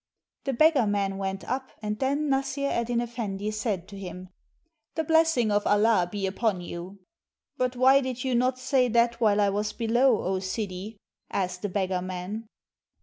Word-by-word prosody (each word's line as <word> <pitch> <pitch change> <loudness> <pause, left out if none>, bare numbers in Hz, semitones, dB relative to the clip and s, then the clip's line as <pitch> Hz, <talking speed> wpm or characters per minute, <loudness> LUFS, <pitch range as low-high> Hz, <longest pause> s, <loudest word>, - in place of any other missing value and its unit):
The 270 - 0
beggar 285 -3 +4
man 200 -1 0
went 195 0 -3
up, 260 +1 -2
and 210 0 -3
then 280 +3 0
Nassr 275 0 0
Eddyn 235 0 0
Effendi 215 -4 -4
said 210 -4 -2
to 200 -1 -9
him:' 180 -1 -8 0.3
— 325 -2 -51
"The 320 - 0
blessing 320 -8 +3
of 205 0 +1
Allah 205 -4 +3
be 205 -2 -2
upon 190 0 0
you!" 175 +3 -8 0.5
"But 255 0 -1
why 265 +2 +5
did 255 -2 -4
you 260 -1 0
not 250 +1 +2
say 255 0 +2
that 235 0 +2
while 210 -2 +4
I 205 -1 +4
was 210 +1 -1
below, 240 +1 +2
O 190 +1 0
Sidi?" 195 +1 -4 0.3
asked 180 -2 -2
the 205 - -2
beggar 185 -1 -1
man. 185 +5 -5
220 Hz, 175 wpm, -27 LUFS, 195-255 Hz, 0.5 s, why